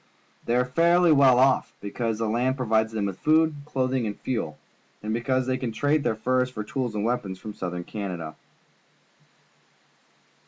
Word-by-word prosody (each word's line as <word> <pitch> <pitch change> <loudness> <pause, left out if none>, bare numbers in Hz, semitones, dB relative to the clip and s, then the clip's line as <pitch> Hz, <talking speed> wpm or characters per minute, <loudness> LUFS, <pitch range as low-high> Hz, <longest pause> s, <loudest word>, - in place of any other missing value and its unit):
They 120 - +1
are 125 0 +3
fairly 170 +6 +4
well 135 -4 +6
off, 130 +1 +3
because 110 +2 -3
the 115 0 -1
land 125 +4 0
provides 110 -3 +1
them 110 -2 -2
with 95 -2 -4
food, 160 +1 +3
clothing, 130 -4 -1
and 105 - -6
fuel, 115 -12 -3 0.5
and 110 +1 -2
because 130 +2 0
they 130 0 0
can 125 -3 -3
trade 145 +6 +1
their 110 - 0
furs 125 +3 +1
for 110 -4 -5
tools 120 0 -3
and 105 0 -1
weapons 105 -6 -2
from 105 +2 -8
Soutliern 90 -2 -5
Canada. 90 -7 -5
120 Hz, 165 wpm, -25 LUFS, 105-130 Hz, 0.5 s, well